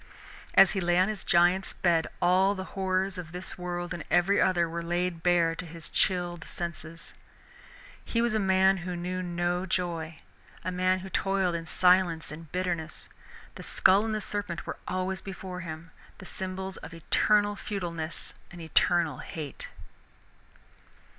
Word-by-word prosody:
As 195 - +8
he 195 - -1
lay 175 0 +2
on 185 +3 +4
his 215 -2 -4
giant's 175 +2 +3
bed 170 -3 +2 0.2
all 190 +3 +4
the 190 - -4
horrors 190 -1 0
of 165 -3 -7
this 180 +1 -2
world 175 -1 -4
and 170 -2 -5
every 175 +3 +4
other 175 -3 +3
were 170 +1 -4
laid 175 0 -1
bare 170 -1 +3
to 175 - -5
his 165 -2 -8
chilled 175 -3 +1
senses. 165 -1 -5 0.9
He 230 - -1
was 235 -1 +2
a 220 - +2
man 190 -1 +4
who 180 0 -4
knew 180 +1 -3
no 175 +1 -1
joy, 165 -4 -2 0.5
a 185 - -1
man 185 +1 +1
who 190 - -8
toiled 195 -2 +1
in 165 -1 -4
silence 180 -3 +3
and 155 -1 -10
bitterness. 175 -3 -3 0.4
The - - -9
skull 195 +3 +4
and 220 -1 -1
the 215 - -2
serpent 200 -6 -4
were - - -5
always 185 +1 -2
before 190 -2 -7
him, 165 -1 -7 0.3
the - - -11
symbols 190 0 -4
of 165 - -9
eternal 205 +5 +2
futileness 170 -6 -4 0.2
and 175 - -11
of 165 - -7
eternal 160 -3 +2
hate. 150 -5 -6
180 Hz, 160 wpm, -28 LUFS, 170-190 Hz, 0.9 s, As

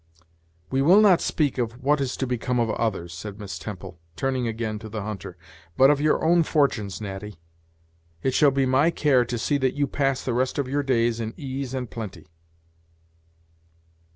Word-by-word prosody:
"We 135 0 +1
will 175 +9 +6
not 195 -5 +5
speak 145 -4 0
of 120 +2 -3
what 145 +1 +2
is 130 -2 -2
to 130 - -1
become 125 0 -1
of 115 -2 +1
others," 95 -7 -2
said 100 +4 -7
Miss 100 -2 -6
Temple, 95 -5 -8 0.2
turning 130 -2 -1
again 110 -1 -3
to 110 0 -9
the 105 -1 -5
hunter 100 -4 -6 0.4
"but 135 +2 +7
of 145 -1 +1
your 155 0 +2
own 170 +1 +5
fortunes, 140 - 0
Natty. 100 -2 -7 0.8
It 130 - +1
shall 145 +2 +5
be 135 0 +1
my 130 +5 +3
care 145 -6 +3
to 120 0 -3
see 145 +5 0
that 130 -1 0
you 145 0 +1
pass 135 -1 -1
the 125 - -1
rest 130 +2 0
of 140 -3 -1
your 145 +2 0
days 120 -4 +1
in 110 0 -4
ease 135 -1 -5
and 125 -1 -3
plenty." 100 -8 -8
125 Hz, 185 wpm, -25 LUFS, 110-140 Hz, 0.8 s, but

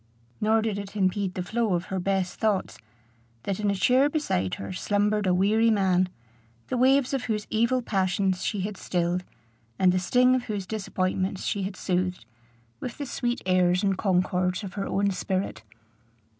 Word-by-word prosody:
Nor 220 +1 +3
did 210 -3 -1
it 200 0 -8
impede 190 -1 0
the 180 - -2
flow 220 0 0
of 175 - -2
her 190 - 0
best 190 0 -1
thoughts, 210 -3 0 0.6
that 195 0 -2
in 210 -1 +1
a 200 - +1
chair 255 +8 +4
beside 95 - -1
her 100 -1 -6
slumbered 205 - +1
a - - +4
weary 210 +5 +3
man, 185 -4 +2 0.6
the 255 - -1
waves 265 +1 +4
of 265 -2 -1
whose 210 -2 -2
evil 235 +3 +2
passions 190 -2 0
she 205 - -1
had 200 +1 -4
stilled, 175 0 -1 0.5
and 185 -1 +4
the 185 - +1
sting 250 +7 +4
of 255 -1 0
whose 205 -4 -3
disappointments 190 -2 -2
she 200 - -1
had 190 0 -4
soothed, 180 -5 -1 0.5
with 240 - -6
the 285 - -4
sweet 240 -2 -2
airs 180 0 +3
and 195 -1 +2
concords 185 0 0
of 190 -2 -6
her 195 -1 -3
own 200 0 +1
spirit. 185 - -2
195 Hz, 175 wpm, -26 LUFS, 185-220 Hz, 0.6 s, chair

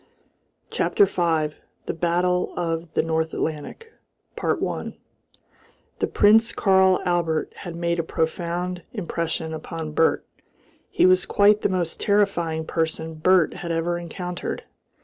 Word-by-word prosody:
CHAPTER 410 - +3
V. 160 - 0 0.3
THE - - -2
BATTLE 175 +2 0
OF 165 -1 -2
THE - - +3
NORTH 160 0 -1
ATLANTIC 160 - -5 0.4
1 - - -2 1.0
The - - +1
Prince 220 +2 +4
Karl 190 -2 +4
Albert 170 -3 0
had 175 -3 -7
made 170 0 -1
a - - +1
profound 175 +3 -2
impression 165 -5 -3
upon 160 0 -6
Bert. 160 +2 +2 0.6
He - - +3
was 185 0 +4
quite 205 +1 +4
the - - +1
most 180 -3 -2
terrifying 175 -6 +1
person 160 0 -2
Bert 165 +1 +3
had 170 - -5
ever 170 +1 -1
encountered. 175 +1 -5
170 Hz, 125 wpm, -24 LUFS, 160-185 Hz, 1.0 s, Prince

